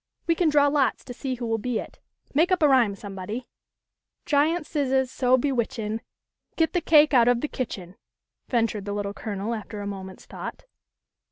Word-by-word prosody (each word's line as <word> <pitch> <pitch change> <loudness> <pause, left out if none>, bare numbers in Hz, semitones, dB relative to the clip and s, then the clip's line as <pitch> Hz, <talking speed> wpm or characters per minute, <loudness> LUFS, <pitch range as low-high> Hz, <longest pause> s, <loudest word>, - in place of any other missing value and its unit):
We 335 - +3
can 330 -1 +2
draw 290 -1 +5
lots 280 -4 +1
to 250 - -8
see 260 +1 -3
who 240 -1 -5
will 225 -1 0
be 245 +1 -1
it. - - -7 0.3
Make 325 +6 +3
up 365 -3 +3
a - - +7
rhyme 245 -7 +4
somebody." 200 +4 -6 0.4
" - - -59
Giant 305 +3 +2
Scissahs, 265 -4 0
so 255 0 +3
bewitchin', 230 -4 -1 0.5
Get 325 -1 +1
the 355 - +1
cake 300 -2 +5
out 240 -2 +6
of 245 -1 +3
the 300 - -1
kitchen! 195 -9 -5 0.3
" - - -58
ventured 225 -4 0
the 205 - -3
Little 205 -1 -3
Colonel 205 +1 -4
after 215 -1 -6
a 205 - -5
moment's 190 -2 -7
thought. - - -8
245 Hz, 190 wpm, -25 LUFS, 210-285 Hz, 0.5 s, a